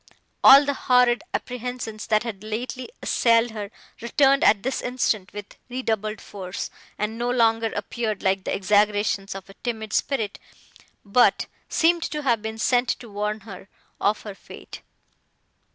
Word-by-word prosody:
All 275 Hz, +2 st, +9 dB
the 285 Hz, -, 0 dB
horrid 250 Hz, 0 st, +3 dB
apprehensions, 245 Hz, -3 st, -5 dB
that 215 Hz, 0 st, +2 dB
had 215 Hz, -4 st, -6 dB
lately 240 Hz, -, -5 dB
assailed 230 Hz, 0 st, +3 dB
her, 210 Hz, -2 st, -6 dB, 0.3 s
returned 275 Hz, +4 st, +3 dB
at 205 Hz, -2 st, +4 dB
this 265 Hz, +2 st, -2 dB
instant 225 Hz, -6 st, -1 dB
with 205 Hz, -1 st, -9 dB
redoubled 220 Hz, -4 st, -2 dB
force, 185 Hz, -2 st, -6 dB, 0.3 s
and 220 Hz, +2 st, -3 dB
no 240 Hz, +1 st, -1 dB
longer 225 Hz, -2 st, +2 dB
appeared 215 Hz, 0 st, -3 dB
like 190 Hz, 0 st, +1 dB
the -, -, -2 dB
exaggerations 205 Hz, 0 st, +1 dB
of 195 Hz, -1 st, -8 dB
a 195 Hz, -, -13 dB
timid 220 Hz, -3 st, -4 dB
spirit, 225 Hz, -8 st, -1 dB, 0.7 s
but 225 Hz, +5 st, +3 dB, 0.2 s
seemed 335 Hz, +1 st, +3 dB
to 300 Hz, -2 st, -3 dB
have 235 Hz, -5 st, +2 dB
been 220 Hz, 0 st, -5 dB
sent 245 Hz, +2 st, +2 dB
to 235 Hz, -3 st, -3 dB
warn 210 Hz, +1 st, -3 dB
her 195 Hz, -2 st, -11 dB, 0.3 s
of 210 Hz, +1 st, +1 dB
her 205 Hz, -, -7 dB
fate. -, -, -12 dB
220 Hz, 150 wpm, -24 LUFS, 205-250 Hz, 0.7 s, All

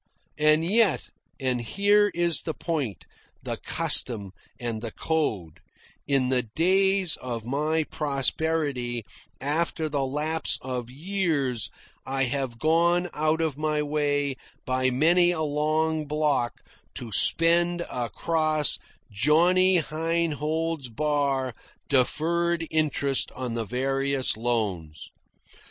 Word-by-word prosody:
And 155 Hz, +1 st, +4 dB
yet 205 Hz, -1 st, +2 dB, 0.3 s
and 130 Hz, -3 st, 0 dB
here 205 Hz, -, +3 dB
is 170 Hz, -1 st, +3 dB
the 160 Hz, -, -4 dB
point, 140 Hz, -, -3 dB, 0.4 s
the -, -, -3 dB
custom, 100 Hz, -6 st, +2 dB, 0.3 s
and 115 Hz, -3 st, -3 dB
the 115 Hz, -, -3 dB
code 110 Hz, -, -2 dB, 0.5 s
in 135 Hz, -3 st, +2 dB
the 130 Hz, -1 st, +2 dB
days 185 Hz, -, +2 dB
of 120 Hz, -3 st, -5 dB
my 155 Hz, +5 st, 0 dB
prosperity, 140 Hz, -4 st, -1 dB, 0.3 s
after 160 Hz, +3 st, -1 dB
the 140 Hz, -2 st, -1 dB
lapse 150 Hz, +4 st, -1 dB
of 125 Hz, -2 st, -4 dB
years, 145 Hz, -, -1 dB, 0.3 s
I 135 Hz, 0 st, -1 dB
have 130 Hz, -2 st, -2 dB
gone 170 Hz, +5 st, +2 dB
out 155 Hz, +2 st, 0 dB
of 155 Hz, -3 st, -2 dB
my 155 Hz, -1 st, 0 dB
way 145 Hz, -2 st, -1 dB, 0.3 s
by 130 Hz, 0 st, +1 dB
many 170 Hz, +7 st, +4 dB
a 175 Hz, -2 st, -1 dB
long 155 Hz, +1 st, 0 dB
block 145 Hz, -5 st, 0 dB, 0.3 s
to 120 Hz, -2 st, -6 dB
spend 170 Hz, -, +3 dB
across 155 Hz, +4 st, 0 dB, 0.3 s
Johnny 170 Hz, -, +4 dB
Heinhold's 160 Hz, -2 st, -2 dB
bar 140 Hz, 0 st, 0 dB, 0.4 s
deferred 165 Hz, +5 st, +1 dB
interest 145 Hz, -3 st, +1 dB
on 125 Hz, -2 st, -4 dB
the 115 Hz, -1 st, -2 dB
various 135 Hz, +3 st, 0 dB
loans. 105 Hz, -9 st, -3 dB
150 Hz, 110 wpm, -26 LUFS, 130-165 Hz, 0.5 s, And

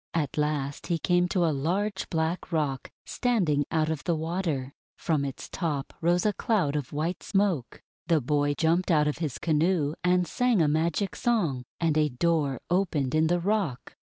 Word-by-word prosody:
At 150 Hz, -5 st, -1 dB
last 150 Hz, -2 st, -2 dB
he 170 Hz, -, +1 dB
came 175 Hz, +2 st, +2 dB
to 180 Hz, -1 st, +1 dB
a 160 Hz, -, +2 dB
large 190 Hz, +8 st, -1 dB
black 165 Hz, +3 st, -2 dB
rock 145 Hz, -5 st, -1 dB, 0.2 s
standing 175 Hz, -, +1 dB
out 160 Hz, -1 st, +1 dB
of 155 Hz, -2 st, -4 dB
the 170 Hz, -, +1 dB
water. 160 Hz, -5 st, -2 dB, 0.2 s
From 155 Hz, -4 st, 0 dB
its 135 Hz, -2 st, -5 dB
top 150 Hz, -6 st, -3 dB
rose 175 Hz, +3 st, +2 dB
a 210 Hz, -, +3 dB
cloud 185 Hz, -, 0 dB
of 145 Hz, -4 st, -3 dB
white 160 Hz, +5 st, -2 dB
smoke. 195 Hz, -, -1 dB, 0.2 s
The 165 Hz, -3 st, +4 dB
boy 145 Hz, +2 st, +1 dB
jumped 170 Hz, +4 st, +1 dB
out 150 Hz, -3 st, +4 dB
of 150 Hz, -, -2 dB
his 155 Hz, -7 st, -3 dB
canoe, 160 Hz, -1 st, +1 dB
and 180 Hz, 0 st, +3 dB
sang 245 Hz, -4 st, +2 dB
a 160 Hz, -, +4 dB
magic 165 Hz, +6 st, 0 dB
song, 170 Hz, -, 0 dB
and 165 Hz, -3 st, +1 dB
a 150 Hz, -1 st, +3 dB
door 145 Hz, 0 st, 0 dB
opened 165 Hz, -8 st, +1 dB
in 155 Hz, +1 st, +3 dB
the 175 Hz, +2 st, +2 dB
rock. 185 Hz, -, -1 dB
160 Hz, 180 wpm, -27 LUFS, 145-180 Hz, 0.2 s, The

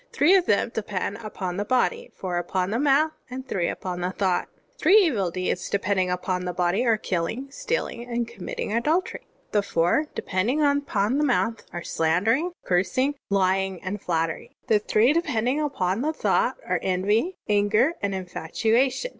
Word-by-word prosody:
Three 305 Hz, +6 st, +4 dB
of 375 Hz, -3 st, +4 dB
them 210 Hz, +3 st, +2 dB
depend 200 Hz, -2 st, -3 dB
upon 195 Hz, -5 st, -5 dB
the 205 Hz, -, 0 dB
body, 470 Hz, -, 0 dB
fotir 180 Hz, -2 st, -2 dB
upon 180 Hz, +2 st, -2 dB
the 230 Hz, -, 0 dB
mouth, 295 Hz, +2 st, +3 dB, 0.2 s
and 260 Hz, +1 st, -7 dB
three 175 Hz, -3 st, -1 dB
upon 180 Hz, -1 st, -4 dB
thought. 185 Hz, -2 st, 0 dB, 0.3 s
"Three 390 Hz, -, +5 dB
evil 250 Hz, -, +3 dB
deeds 180 Hz, 0 st, -2 dB
depending 195 Hz, -2 st, 0 dB
upon 180 Hz, 0 st, -2 dB
the 180 Hz, -, -2 dB
body 180 Hz, +6 st, +1 dB
are: 225 Hz, -1 st, +4 dB
killing, 215 Hz, +9 st, -3 dB
stealing, 275 Hz, -, -3 dB
and 235 Hz, -1 st, -1 dB
committing 235 Hz, -2 st, -5 dB
adultery. 310 Hz, +11 st, 0 dB, 0.2 s
The 205 Hz, -, +3 dB
four 180 Hz, -, +1 dB
depending 210 Hz, +10 st, 0 dB
upon 280 Hz, -5 st, +1 dB
the -, -, +2 dB
mouth 230 Hz, -4 st, +1 dB
are: 175 Hz, -, -5 dB
slan* 165 Hz, +3 st, +1 dB
dering, 300 Hz, +11 st, +2 dB
cursing, 190 Hz, +10 st, +1 dB, 0.2 s
lying, 190 Hz, -1 st, +1 dB
and 190 Hz, +1 st, -4 dB
flattery. 165 Hz, -2 st, -2 dB
The 215 Hz, -, +3 dB
three 215 Hz, +5 st, +3 dB
depending 260 Hz, -4 st, 0 dB
upon 225 Hz, -9 st, -1 dB
thought -, -, +1 dB
are: -, -, 0 dB
envy, 205 Hz, -, 0 dB
anger, 210 Hz, +8 st, +3 dB
and 200 Hz, -1 st, -1 dB
infatuation. 220 Hz, -, 0 dB
210 Hz, 160 wpm, -25 LUFS, 185-265 Hz, 0.3 s, Three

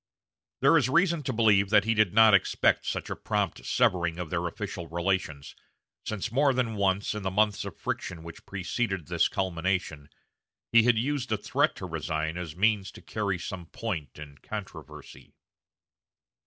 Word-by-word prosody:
There 140 Hz, +5 st, +6 dB
is 130 Hz, -3 st, 0 dB
reason 170 Hz, +2 st, +2 dB
to 140 Hz, -, -3 dB
believe 105 Hz, -3 st, +3 dB
that 105 Hz, -1 st, +5 dB
he 110 Hz, +2 st, +1 dB
did 110 Hz, -4 st, +3 dB
not 110 Hz, +1 st, +6 dB
expect 100 Hz, -, +2 dB
such -, -, -3 dB
a -, -, -2 dB
prompt -, -, -2 dB
severing 85 Hz, -2 st, +1 dB
of 90 Hz, -3 st, -6 dB
their 85 Hz, 0 st, -1 dB
official 90 Hz, -2 st, -6 dB
relations, 85 Hz, -4 st, -2 dB, 0.5 s
since 110 Hz, 0 st, -3 dB
more 135 Hz, +2 st, +3 dB
than 125 Hz, -3 st, 0 dB
once, 100 Hz, 0 st, 0 dB
in 105 Hz, -, -5 dB
the 95 Hz, -, -1 dB
months 105 Hz, +1 st, +1 dB
of -, -, -8 dB
friction 85 Hz, -2 st, -4 dB
which 85 Hz, -1 st, -11 dB
preceded 95 Hz, -1 st, -2 dB
this -, -, +2 dB
culmination, 90 Hz, -5 st, -2 dB, 0.6 s
he 115 Hz, -, +7 dB
had 120 Hz, 0 st, +3 dB
used 130 Hz, +1 st, -1 dB
a 110 Hz, -, +2 dB
threat 105 Hz, -, 0 dB
to -, -, -7 dB
resign 80 Hz, -1 st, -3 dB
as 85 Hz, -4 st, -6 dB
means 100 Hz, 0 st, +2 dB
to -, -, -12 dB
carry 100 Hz, -4 st, -2 dB
some 90 Hz, 0 st, -7 dB
point 80 Hz, -, -5 dB
in 75 Hz, -2 st, -11 dB
controversy. 80 Hz, -9 st, -9 dB
95 Hz, 170 wpm, -28 LUFS, 85-110 Hz, 0.6 s, he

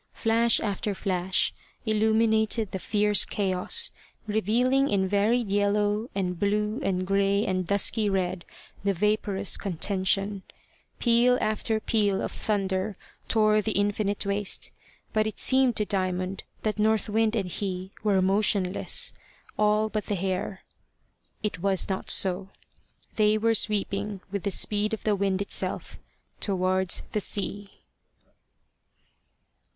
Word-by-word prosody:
Flash 230 Hz, +1 st, +3 dB
after 205 Hz, -1 st, -2 dB
flash 185 Hz, -1 st, 0 dB, 0.3 s
illuminated 220 Hz, 0 st, +2 dB
the 190 Hz, -, -4 dB
fierce 210 Hz, +1 st, +3 dB
chaos, 200 Hz, -, +2 dB, 0.3 s
revealing 240 Hz, +6 st, +1 dB
in 190 Hz, -2 st, +1 dB
varied 205 Hz, +3 st, +1 dB
yellow 205 Hz, +2 st, +1 dB
and 180 Hz, -3 st, -2 dB
blue 210 Hz, +3 st, 0 dB
and 185 Hz, -5 st, -1 dB
grey 200 Hz, +1 st, +1 dB
and 185 Hz, -2 st, -1 dB
dusky 205 Hz, +1 st, +2 dB
red 185 Hz, -2 st, -1 dB, 0.4 s
the 200 Hz, 0 st, +1 dB
vapourous 200 Hz, 0 st, +1 dB
contention; 195 Hz, +2 st, -1 dB, 0.6 s
peal 240 Hz, +1 st, +3 dB
after 220 Hz, +1 st, 0 dB
peal 205 Hz, -3 st, +1 dB
of -, -, -3 dB
thunder 195 Hz, -1 st, -2 dB, 0.3 s
tore 215 Hz, -1 st, +3 dB
the 215 Hz, +1 st, -2 dB
infinite 205 Hz, 0 st, 0 dB
waste; 200 Hz, 0 st, -1 dB, 0.4 s
but 215 Hz, 0 st, +2 dB
it 215 Hz, -, -5 dB
seemed 260 Hz, -2 st, +3 dB
to 210 Hz, -, 0 dB
Diamond 185 Hz, -1 st, -2 dB, 0.2 s
that 215 Hz, -1 st, -2 dB
North 220 Hz, 0 st, +2 dB
Wind 220 Hz, +1 st, +1 dB
and 195 Hz, -5 st, -2 dB
he 190 Hz, -1 st, -4 dB
were 195 Hz, -3 st, +2 dB
motionless, 200 Hz, -, +1 dB, 0.4 s
all 210 Hz, +1 st, +2 dB
but 215 Hz, -1 st, -4 dB
the 205 Hz, -, -1 dB
hair. 190 Hz, +1 st, -3 dB, 0.8 s
It 210 Hz, -5 st, -2 dB
was 195 Hz, +1 st, +2 dB
not 190 Hz, -1 st, -3 dB
so. 190 Hz, 0 st, +2 dB, 0.7 s
They 215 Hz, 0 st, +3 dB
were 225 Hz, +1 st, +2 dB
sweeping 205 Hz, -2 st, 0 dB
with 200 Hz, -1 st, -2 dB
the -, -, +1 dB
speed 210 Hz, +2 st, +1 dB
of -, -, -17 dB
the 210 Hz, -1 st, +2 dB
wind 195 Hz, -1 st, 0 dB
itself -, -, -3 dB, 0.4 s
towards 185 Hz, -1 st, +1 dB
the 210 Hz, -, 0 dB
sea. 200 Hz, +1 st, -3 dB
205 Hz, 125 wpm, -26 LUFS, 190-215 Hz, 0.8 s, Flash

